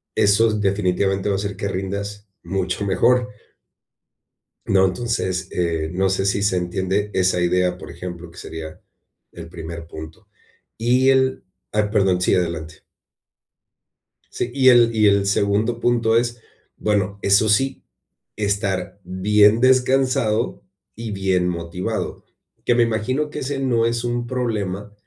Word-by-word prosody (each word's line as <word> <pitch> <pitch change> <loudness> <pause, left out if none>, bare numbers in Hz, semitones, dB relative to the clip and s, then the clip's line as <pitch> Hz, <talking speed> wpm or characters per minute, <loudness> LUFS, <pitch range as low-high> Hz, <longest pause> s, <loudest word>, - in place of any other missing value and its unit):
esos, 105 +1 +3
definitivamente, 95 0 0
va 100 - +1
a - - -1
hacer 100 0 -3
que 100 - -3
rindas 100 +2 -4 0.2
mucho 95 +2 -2
mejor 125 +6 +2 1.4
¿no? 95 -1 +4
Entonces, 95 -2 -2
eh, 85 -3 -1
no 95 +1 +1
sé 95 0 0
si 100 0 +1
se 100 -2 +2
entiende 95 +3 -1
esa 95 -1 +2
idea, 90 0 +1
por - - -10
ejemplo, 85 -1 -8
que 85 - -18
sería 80 -2 -8 0.5
el 85 -1 -10
primer 85 -1 -8
punto, 80 -1 -10 0.5
y 125 +3 +3
el 130 0 +2 0.3
Ay, 105 0 +2
perdón, 95 -4 +2
sí, 90 - +2
adelante. 85 -2 -2 1.5
Sí, 120 - -4
y 130 -1 +5
el 120 -2 +5
y 105 -1 +4
el 100 -1 +3
segundo 100 +4 +1
punto 115 -2 +2
es, 120 0 -1 0.4
bueno, 100 -1 -1
eso 100 +2 +3
sí, 135 +6 +1 0.5
estar 100 -2 -2
bien 105 +3 +3
descansado 130 -3 +2 0.3
y 115 0 -6
bien 95 -2 0
motivado, 85 +1 -4 0.4
que 120 - +3
me 120 - +4
imagino 120 +6 -1
que - - -6
ese 135 +1 -3
no 120 -4 +1
es 115 0 -1
un 120 0 -2
problema, 105 -5 -3
100 Hz, 140 wpm, -21 LUFS, 90-115 Hz, 1.5 s, y